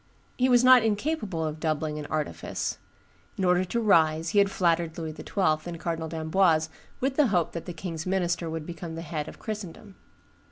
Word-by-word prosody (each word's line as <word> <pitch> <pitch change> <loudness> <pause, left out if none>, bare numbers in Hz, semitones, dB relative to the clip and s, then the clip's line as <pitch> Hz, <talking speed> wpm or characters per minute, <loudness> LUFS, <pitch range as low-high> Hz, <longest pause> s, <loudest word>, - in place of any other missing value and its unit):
He 255 +1 +2
was 245 -1 +5
not 255 -1 +8
incapable 215 - -1
of 155 0 -4
doubling 155 -1 -1
and 150 - -6
artifice. 150 - -3 0.6
In 190 - 0
order 180 0 +3
to 235 +6 -1
rise 165 -6 +3
he 205 - +3
had 200 -1 +4
flattered 170 -3 +1
Louis 160 -2 -4
XII. 160 -4 0
and 170 -1 -6
Cardinal 165 -1 -3
d'Amboise 160 0 +2 0.3
with 265 +1 -1
the 300 -3 +5
hope 180 -6 +1
that 170 - -6
the 180 - -5
king's 165 -1 -5
minister 175 -3 0
would 160 -1 -4
become 170 -1 -7
the 165 - -6
head 155 -2 -4
of - - -9
Christendom. 205 -2 -7
170 Hz, 190 wpm, -27 LUFS, 160-200 Hz, 0.6 s, not